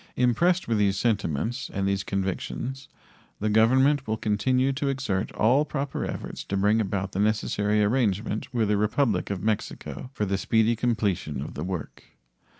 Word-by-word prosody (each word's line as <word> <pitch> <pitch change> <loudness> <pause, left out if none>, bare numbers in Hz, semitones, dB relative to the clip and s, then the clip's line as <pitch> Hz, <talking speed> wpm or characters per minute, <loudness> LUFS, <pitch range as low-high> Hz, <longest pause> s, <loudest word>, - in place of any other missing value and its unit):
Impressed 170 +9 +2
with 115 -2 +1
these 100 -1 +2
sentiments 115 - -1
and 95 0 -1
these 100 0 0
convictions, 100 +8 -3 0.5
the 105 0 0
Government 130 +6 +4
will 110 0 -1
continue 130 +6 +1
to 140 +1 -2
exert 130 -8 -1
all 125 +7 +3
proper 140 -2 -3
efforts - - -5
to 100 - -3
bring 105 +3 +3
about 100 -1 -2
the 95 - -3
necessary 105 0 +1
arrangement 105 -2 0
with 115 -4 +1
the 105 - +3
Republic 105 -2 +1
of 100 -2 -3
Mexico 110 +3 -3
for 105 -6 -2
the 95 0 -1
speedy 110 +2 +2
completion 105 -10 -1
of - - -6
the 75 - -5
work. 90 -3 -5
110 Hz, 160 wpm, -26 LUFS, 100-125 Hz, 0.5 s, Government